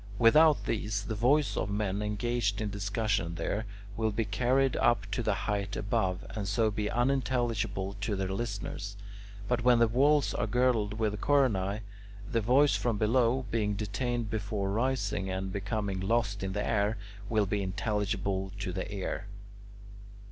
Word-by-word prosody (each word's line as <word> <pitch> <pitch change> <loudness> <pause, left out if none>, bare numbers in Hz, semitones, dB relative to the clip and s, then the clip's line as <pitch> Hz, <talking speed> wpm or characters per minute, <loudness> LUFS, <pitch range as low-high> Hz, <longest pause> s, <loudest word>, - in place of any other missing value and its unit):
Without 150 +7 +5
these, 105 -2 -1
the 110 - -3
voice 130 +7 +2
of 100 - -1
men 100 -1 -1
engaged 105 0 -1
in 105 -2 -2
discussion 100 -3 -1
there 100 +6 -2 0.3
will 110 -1 +1
be 110 +2 -1
carried 125 +5 +2
up 120 -4 +3
to 105 - -1
the 110 -3 +1
height 100 -1 -1
above, 95 -2 -1
and 105 -3 -4
so 110 +2 +2
be 105 0 -2
unintelligible 120 -6 0
to 105 0 -1
their 95 -1 -2
listeners. 100 -2 -4 0.5
But 120 -1 0
when 125 -1 +6
the 115 0 +5
walls 140 +5 +3
are 105 - -1
girdled 115 -3 +1
with 105 -2 -1
coronae, 110 -8 +2 0.5
the 115 - 0
voice 135 +6 +4
from 115 -3 0
below, 120 +4 +2
being 105 -2 0
detained 115 +3 -2
before 100 -2 -2
rising 105 -4 0
and 95 0 -3
becoming 100 -1 -2
lost 105 0 0
in 95 0 -3
the 105 +1 -1
air, 105 0 +1 0.3
will 110 -2 +2
be 100 +1 -1
intelligible 100 -1 -2
to 95 -3 -4
the 95 +2 -4
ear. 100 0 -4
105 Hz, 155 wpm, -30 LUFS, 100-120 Hz, 0.5 s, when